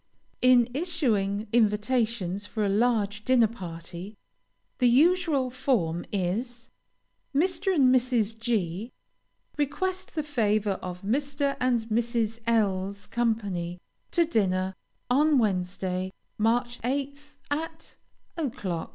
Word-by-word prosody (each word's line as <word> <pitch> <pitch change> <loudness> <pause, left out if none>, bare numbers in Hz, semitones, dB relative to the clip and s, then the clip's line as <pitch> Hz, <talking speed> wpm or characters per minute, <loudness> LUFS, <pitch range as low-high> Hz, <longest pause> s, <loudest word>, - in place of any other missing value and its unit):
In 250 -2 +6
issuing 235 - 0
invitations 210 -3 +1
for 215 -1 -1
a - - +1
large 215 -1 +1
dinner 255 -2 +5
party, 180 -1 -7 0.6
the 250 - +5
usual 295 -1 +3
form 215 -11 0
is 230 +6 -2 0.6
_Mr. 360 +5 +2
and 260 -4 +5
Mrs. 240 -4 +2
G 220 -2 -1 0.7
request 370 +7 -2
the 310 - 0
favor 215 -8 0
of 180 0 -6
Mr. 280 +5 0
and 250 -2 +2
Mrs. 225 0 -1
L 200 -4 +2
's 200 0 -12
company 200 -7 -1 0.3
to 340 -1 +3
dinner, 190 - +1 0.3
on 290 +3 +4
Wednesday, 185 -3 -1 0.3
March 240 +3 +1
8th, 280 +3 -3 0.2
at 320 +2 -4 0.4
o'clock. 230 - -3
230 Hz, 110 wpm, -27 LUFS, 200-270 Hz, 0.7 s, In